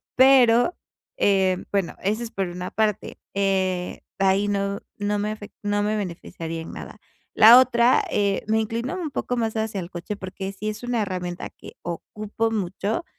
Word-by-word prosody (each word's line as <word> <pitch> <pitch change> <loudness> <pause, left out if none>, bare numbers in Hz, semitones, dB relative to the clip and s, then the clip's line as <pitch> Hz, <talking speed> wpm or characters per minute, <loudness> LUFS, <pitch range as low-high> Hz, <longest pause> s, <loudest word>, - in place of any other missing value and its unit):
Pero, 260 +2 +5 0.4
eh, 190 -2 +2
bueno, 195 -3 0
eso 215 +5 -1
es 230 - -6
por 195 -1 -2
una 180 +1 -6
parte, 215 -2 -1
eh, 190 -2 0 0.2
ahí 195 +1 +3
no 200 0 -1 0.2
no 205 0 0
me 210 +1 -1
afec 215 -1 -8
no 205 0 0
me 215 +1 0
beneficiaría 165 -3 -5
en 160 - -8
nada. - - -9 0.4
La 230 +3 +9
otra, 245 -1 +4
eh, 200 -1 +1
me 220 +1 +2
inclino 230 - -3
un 340 -5 -4
poco 250 - -2
más 225 -2 -1
hacia 220 -3 -2
el 170 - -7
coche, 175 +4 -5
porque 190 0 -6
sí 215 +2 -4
es 215 - -6
una 245 -2 0
herramienta 180 -3 -4
que - - -14
ocupo 210 +6 -3
mucho, 205 - -2
205 Hz, 175 wpm, -24 LUFS, 190-225 Hz, 0.4 s, La